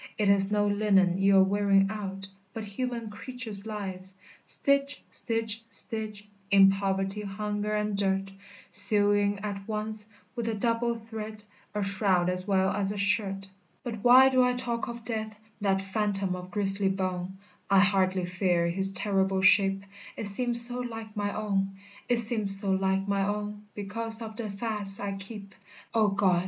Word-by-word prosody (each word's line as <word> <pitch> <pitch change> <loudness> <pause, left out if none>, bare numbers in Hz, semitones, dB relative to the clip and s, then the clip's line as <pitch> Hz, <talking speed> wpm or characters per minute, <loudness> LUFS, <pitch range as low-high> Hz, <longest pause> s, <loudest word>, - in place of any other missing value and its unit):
It 210 -2 +1
is 200 0 +3
no 205 0 +1
linen 200 -3 +2
you're 195 0 +5
wearing 195 0 +2
out, 195 -2 -6 0.3
But 225 - -5
human 230 +1 -5
creatures' 220 -3 -4
lives! 190 -3 -5 0.3
Stitch! 280 0 +1
stitch! 225 -1 0
stitch, 215 -1 -1 0.2
In 195 -1 +6
poverty, 195 +1 -2
hunger, 210 +1 -4
and 210 -1 -1
dirt, 195 -1 -1 0.4
Sewing 205 +1 +2
at 195 -2 -6
once, 215 0 -3 0.3
with 235 -2 -4
a 225 - -1
double 235 +2 -1
thread, 220 -1 -8 0.3
A 210 - -1
shroud 190 -2 +3
as 180 +1 -4
well 190 -1 +2
as 200 -1 -2
a 205 - -5
shirt! 195 -1 0 0.4
"But 225 -4 -6
why 255 +2 +7
do 260 -1 +3
I 250 0 +2
talk 235 -1 -3
of 235 -1 -8
death, 220 -2 -5 0.2
That 195 -1 0
phantom 195 -1 -1
of 180 0 -9
grisly 195 -1 +4
bone? 185 -1 -4 0.3
I 195 - +4
hardly 190 -2 +1
fear 180 -2 0
his 195 +2 +2
terrible 195 -1 0
shape, 195 0 +4 0.3
It - - -4
seems 235 +3 +5
so 245 0 -5
like 225 -3 -7
my 205 -1 -2
own, 195 -2 -2 0.3
It 245 - +3
seems 215 -4 +5
so 200 -1 -2
like 190 0 0
my 200 -1 0
own 210 0 -5
Because 225 +2 0
of 220 -1 -8
the 220 -2 -5
fasts 205 -1 -1
I 200 0 -3
keep; 200 0 -10 0.4
O 220 -2 +3
God! 195 -3 +2
205 Hz, 160 wpm, -27 LUFS, 195-220 Hz, 0.4 s, why